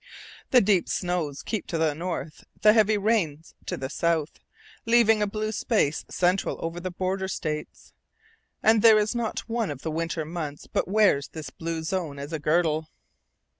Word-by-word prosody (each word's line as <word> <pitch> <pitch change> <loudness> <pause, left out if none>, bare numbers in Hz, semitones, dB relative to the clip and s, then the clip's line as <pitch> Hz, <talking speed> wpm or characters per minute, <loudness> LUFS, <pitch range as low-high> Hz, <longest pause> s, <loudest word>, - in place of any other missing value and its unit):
The 250 - +6
deep 195 -3 +2
snows 175 -6 -2
keep 220 -5 -3
to 165 - -2
the 160 -2 +2
north, 165 -1 -5 0.2
the 210 0 +8
heavy 215 -1 +4
rains 190 -8 0
to - - -2
the 130 - -4
south, 160 +1 -1 0.5
leaving 225 -2 +5
a 210 - +2
blue 215 +1 -3
space 200 - 0
central 180 +2 +1
over 165 +1 -4
the 185 +1 -4
border 190 +1 -2
States. 155 -5 -5 0.7
And 220 -1 +5
there 220 -1 +8
is 210 +2 +1
not 235 -2 -2
one 230 -2 -1
of 140 -2 -6
the 160 - -2
winter 165 0 -2
months 155 -3 -5
but - - -1
wears 195 -8 +3
this 155 -2 -8
blue 165 -1 -4
zone 160 -4 -3
as 140 +3 -7
a 160 - -2
girdle. 155 0 +1
175 Hz, 170 wpm, -26 LUFS, 155-210 Hz, 0.7 s, the